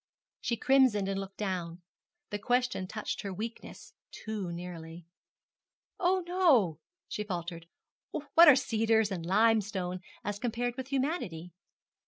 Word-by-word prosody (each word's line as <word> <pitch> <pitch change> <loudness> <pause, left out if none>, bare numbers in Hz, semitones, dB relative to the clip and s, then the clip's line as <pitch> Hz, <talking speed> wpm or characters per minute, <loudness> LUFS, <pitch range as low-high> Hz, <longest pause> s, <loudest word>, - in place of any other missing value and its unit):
She 235 - -1
crimsoned 255 -6 +4
and 195 0 -1
looked 195 0 -7
down. 180 -4 -3 0.5
The 205 - -2
question 245 -4 0
touched 215 +2 -4
her 200 - -5
weakness 220 +5 -7 0.2
too 210 -5 -5
nearly. 170 -1 -8 0.9
'Oh, 370 +1 +2
no,' 290 - +3 0.3
she 210 - -3
faltered; 170 -4 -5 0.4
'what 320 +3 +5
are 295 - +10
cedars 225 -4 +2
and 180 -3 -3
limestone 200 -2 +2 0.2
as 205 0 -3
compared 240 +1 -2
with 260 -1 -5
humanity?' 260 - -2
210 Hz, 125 wpm, -30 LUFS, 180-245 Hz, 0.9 s, are